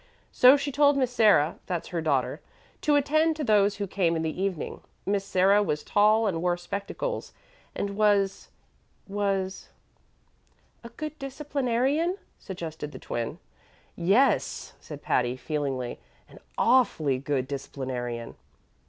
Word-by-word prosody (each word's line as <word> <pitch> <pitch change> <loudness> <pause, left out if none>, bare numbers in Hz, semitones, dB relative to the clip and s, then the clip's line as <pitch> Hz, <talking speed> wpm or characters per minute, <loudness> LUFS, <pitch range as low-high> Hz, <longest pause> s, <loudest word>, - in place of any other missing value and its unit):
So 255 +3 +7
she 285 0 -3
told 285 0 +4
Miss 255 -2 +1
Sarah 205 -10 +4
that's 175 -3 -3
her 170 -2 -2
daughter 160 - 0 0.4
to 295 - +3
attend 310 +3 +2
to 305 - -4
those 205 -4 +3
who 200 0 -3
came 180 -3 0
in 160 - -1
the 160 +3 -3
evening. 190 -5 -3 0.2
Miss 200 0 0
Sarah 195 +2 +3
was 150 -7 -1
tall 215 +2 +3
and 175 -6 -1
wore 175 0 +1
spectacles, 200 - -5 0.4
and 200 - -2
was 205 -2 +1 0.6
was 195 -1 -2 0.5
" - - -39
"A 235 - -8
good 305 +5 -7
disciplinarian," 275 +4 -1 0.2
suggested 160 -5 -7
the - - -7
Twin. 120 -1 -4 0.6
"Yes," 205 +11 +1
said 150 -2 -10
Patty, 125 0 0
feelingly, 135 -3 -3 0.3
"an - - -15 0.2
awfully 160 - +3
good 135 -2 -2
disciplinarian. 130 -4 -5
195 Hz, 135 wpm, -27 LUFS, 155-250 Hz, 0.6 s, So